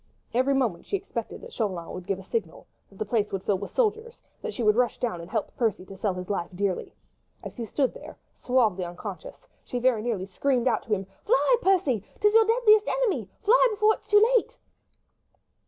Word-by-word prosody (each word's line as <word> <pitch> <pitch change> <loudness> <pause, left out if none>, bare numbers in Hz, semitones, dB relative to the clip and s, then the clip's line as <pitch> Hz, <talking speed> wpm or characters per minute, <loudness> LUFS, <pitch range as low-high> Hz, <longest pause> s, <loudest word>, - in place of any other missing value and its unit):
Every 260 +3 +2
moment 235 -10 -1
she 400 - 0
expected 390 - -6
that 475 0 -11
Chauvelin 185 -7 -3
would 185 -1 -8
give 195 - 0
a 195 - -10
signal, 190 -4 -4 0.2
that 195 - -18
the 215 - -2
place 210 -1 0
would 195 -1 -3
fill 195 -3 0
with 200 - -6
soldiers, 455 0 -1 0.2
that 465 - -4
she 250 - -4
would 210 -1 +4
rush 245 -1 +1
down 220 -9 -2
and 170 - -10
help 215 0 -3
Percy 225 -8 -1
to 195 - -11
sell 195 -1 -1
his 180 0 -6
life 185 -4 -2
dearly. 195 0 -2 0.5
As - - -8
he 235 - -3
stood 265 +3 0
there, - - -11 0.2
suavely 225 -8 +1
unconscious, 175 - -8 0.2
she 250 - -4
very 245 -3 +2
nearly 215 -5 -2
screamed 250 +6 0
out 245 - +2
to - - -9
him,— 195 -2 0 0.2
"Fly, - - +4
Percy!—'tis 370 - +1
your 450 0 +6
deadly 450 -1 +5
enemy!—fly - - +2
before 425 0 +3
it - - -8
be - - -28
too 420 +3 +5
late!" 475 +1 +1
240 Hz, 205 wpm, -26 LUFS, -, 0.5 s, your